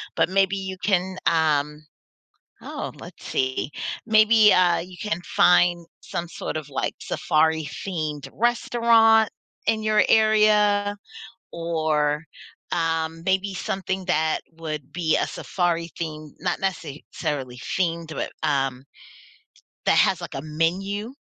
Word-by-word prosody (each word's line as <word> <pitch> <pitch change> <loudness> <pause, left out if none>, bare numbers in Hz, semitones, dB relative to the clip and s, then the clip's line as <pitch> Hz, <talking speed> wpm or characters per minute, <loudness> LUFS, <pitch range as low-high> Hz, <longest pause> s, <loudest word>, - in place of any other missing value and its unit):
but - - +2
maybe 195 0 +2
you 190 -1 -5
can, 185 -1 +1
um 150 -2 +1 0.8
oh, - - -5
let's - - -12
see, 130 +2 -1 0.4
maybe, 215 -1 +6
uh, 180 -2 +4
you 180 +1 -8
can 190 -5 -1 0.2
find 175 -1 +4 0.2
some 170 0 -5
sort 155 - -4
of, 150 -2 -8
like, 135 - -2
safari-themed 155 -1 -1
restaurant 230 -1 +4 0.4
in 220 -1 +1
your 215 -2 +3
area. 210 -2 +4 0.6
Or, 155 -3 0 0.5
um, 165 -1 -1
maybe 190 +1 0
something 190 0 -3
that 160 -3 +1 0.2
would 155 -3 -6
be 165 -3 +1
a - - 0
safari 170 -2 -2
theme 155 -3 -6
not - - -1
necessarily 145 -7 -4
themed, 165 +4 -2
but, - - -3
um, 135 -4 0 1.0
that - - +4
has, - - +3
like, - - -7
a 135 - -3
menu 190 - -2
170 Hz, 120 wpm, -24 LUFS, 155-200 Hz, 1.0 s, maybe